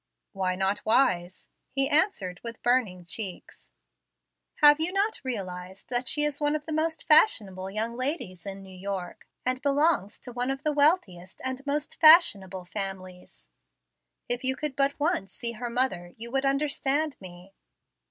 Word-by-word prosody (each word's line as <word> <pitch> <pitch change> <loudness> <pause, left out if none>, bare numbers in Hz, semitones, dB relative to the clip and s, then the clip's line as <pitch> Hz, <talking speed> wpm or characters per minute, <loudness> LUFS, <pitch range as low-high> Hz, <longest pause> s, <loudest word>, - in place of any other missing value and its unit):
"Why 185 -2 -2
not 190 +2 -1
wise?" 185 -7 +1 0.2
he 270 0 +2
answered 285 - +2
with 230 -1 -8
burning 220 -8 +1
cheeks. 180 - -6 0.8
"Have 295 0 +6
you 325 +3 -1
not 400 +3 -1
realized 190 -6 -6
that 245 0 0
she 295 - +2
is 295 0 -1
one 295 +1 +1
of 300 -1 -4
the 315 - -4
most 320 0 -2
fashionable 200 - +4
young 220 +4 -3
ladies 255 - -4
in 195 0 -7
New 190 -1 -13
York, 190 -1 -6 0.2
and 255 +1 -1
belongs 285 - +1
to 245 - -10
one 245 +1 -2
of 270 +1 -4
the 305 -1 0
wealthiest 285 - +1
and 260 +1 -3
most 295 +1 -3
fashionable 200 - +6
families? 185 - -6 0.8
If 245 +1 -3
you 260 0 0
could 295 -1 -5
but 275 +1 0
once 290 - -1
see 235 - -4
her 240 +1 -6
mother 235 -8 -2
you 235 +1 -7
would 270 +1 0
understand 285 +1 0
me." 185 0 -13
245 Hz, 160 wpm, -27 LUFS, 190-290 Hz, 0.8 s, Have